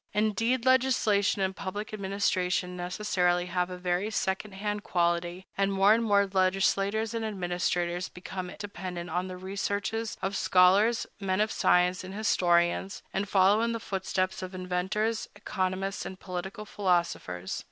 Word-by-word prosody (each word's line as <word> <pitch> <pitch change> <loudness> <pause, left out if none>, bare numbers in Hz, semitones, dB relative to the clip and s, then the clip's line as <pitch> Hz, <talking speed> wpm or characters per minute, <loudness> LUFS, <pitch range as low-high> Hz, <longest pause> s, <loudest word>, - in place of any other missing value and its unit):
Indeed, 230 +4 +1
legislation 245 -7 +3
and 190 0 -1
public 205 +3 -5
administration 185 -3 0
necessarily 180 -1 0
have 180 0 -1
a 180 - -6
very 180 +3 -1
second 190 -1 -2
hand 210 +1 -3
quality; 175 +1 0
and 195 0 +1
more 195 +2 +5
and 230 +1 +2
more 200 -2 +4
legislators 195 +3 +1
and 230 -1 -2
administrators 175 -3 -1
become 180 0 -6
dependent 180 -4 -6
on 180 +2 -1
the 185 -1 -7
researches 200 +3 -3
of 195 +1 -2
scholars, 195 +6 +4
men 190 -1 -1
of 215 +1 +2
science, 180 +1 +3
and 190 +1 -8
historians, 180 -2 +1
and 200 +1 -1
follow 195 +2 +4
in 230 0 +1
the 230 - -3
footsteps 190 -2 -2
of 185 0 -6
inventors, 185 +5 -1
economists, 190 -1 -2
and 190 - -7
political 190 +4 -6
philosophers. 170 - -1
190 Hz, 140 wpm, -29 LUFS, 180-210 Hz, -, more